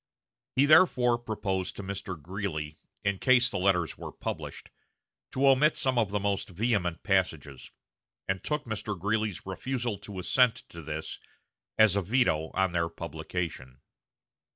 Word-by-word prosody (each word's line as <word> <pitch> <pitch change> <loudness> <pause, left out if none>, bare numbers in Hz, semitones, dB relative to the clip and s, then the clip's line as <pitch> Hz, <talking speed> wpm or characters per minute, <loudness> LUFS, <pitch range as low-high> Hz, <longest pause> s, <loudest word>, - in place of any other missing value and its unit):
He 135 - +5
therefore 125 -7 +5
proposed 100 -5 -3
to 105 - -6
Mr. 95 -3 -5
Greeley, 80 -3 -5 0.2
in 100 -1 0
case 125 -1 +4
the - - -2
letters 90 -4 +1
were - - -6
published, - - -6 0.6
to 135 +1 +2
omit 135 +3 +5
some 130 -2 +1
of 110 -4 +1
the 105 +1 -1
most 100 0 -1
vehement 95 -3 -1
passages; 90 -9 -1 0.6
and 95 0 -2
took 150 -1 -1
Mr. 105 -3 -4
Greeley's 105 0 -1
refusal 115 +3 -3
to 100 -2 -9
assent 115 +6 +2
to 85 - -9
this 80 0 -5 0.6
as 110 -3 +6
a 100 - +2
veto 95 -7 +1
on 95 -1 +2
their 85 -1 0
publication. 80 -5 -5
100 Hz, 145 wpm, -29 LUFS, 85-120 Hz, 0.6 s, as